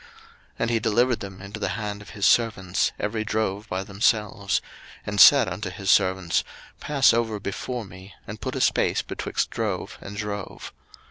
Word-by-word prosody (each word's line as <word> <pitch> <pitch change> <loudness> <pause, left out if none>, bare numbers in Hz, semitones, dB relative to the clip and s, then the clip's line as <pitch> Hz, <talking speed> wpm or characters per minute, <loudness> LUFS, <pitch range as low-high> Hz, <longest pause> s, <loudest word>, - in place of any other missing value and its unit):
01:032:016 - - -19 0.5
And 115 - 0
he 115 - +2
delivered 120 +3 +2
them 95 -1 -8
into 100 +2 -8
the 100 - -1
hand 105 -2 -4
of 105 - -13
his 100 - -2
servants, 100 -6 +2
every 110 +1 -2
drove 110 -1 -2
by 95 +1 -2
themselves; 105 0 0 0.5
and 105 -2 +2
said - - +8
unto 90 +2 -4
his 95 +1 -1
servants, 95 -3 +2 0.4
Pass 140 -5 +3
over 115 -2 0
before 115 +4 -4
me, 95 0 -13
and - - -8
put - - -4
a - - -2
space - - +2
betwixt - - -3
drove - - -3
and 100 +1 -8
drove. 105 -2 -6
105 Hz, 175 wpm, -25 LUFS, 95-110 Hz, 0.5 s, said